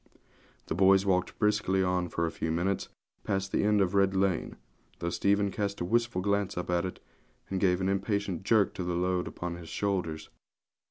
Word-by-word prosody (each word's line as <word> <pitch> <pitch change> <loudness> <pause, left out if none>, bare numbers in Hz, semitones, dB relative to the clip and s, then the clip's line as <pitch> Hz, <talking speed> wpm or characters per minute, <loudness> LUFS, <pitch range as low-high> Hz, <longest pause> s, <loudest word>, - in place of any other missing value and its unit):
The - - -3
boys 95 +2 +5
walked 90 -2 0
briskly 105 -3 +2
on 90 -1 0
for 85 - -1
a 80 - -2
few 80 - -3
minutes, 90 +4 -1 0.3
past 95 -1 -2
the - - +1
end 105 0 +3
of 95 -1 +1
Red 100 -1 +3
Lane, 95 -2 0 0.4
though 85 0 -3
Stephen 100 +1 +2
cast 100 0 -2
a 90 - -2
wistful 115 -2 0
glance 100 -2 0
up 90 0 -3
it, 90 +1 -1 0.5
and 95 - 0
gave 90 -1 +2
an 95 - 0
impatient 100 -2 -1
jerk 105 0 +3
to 90 - -4
the 90 0 -2
load 90 0 0
upon 85 -1 -5
his 85 -2 -10
shoulders. 90 -6 -2
95 Hz, 185 wpm, -29 LUFS, 90-100 Hz, 0.5 s, boys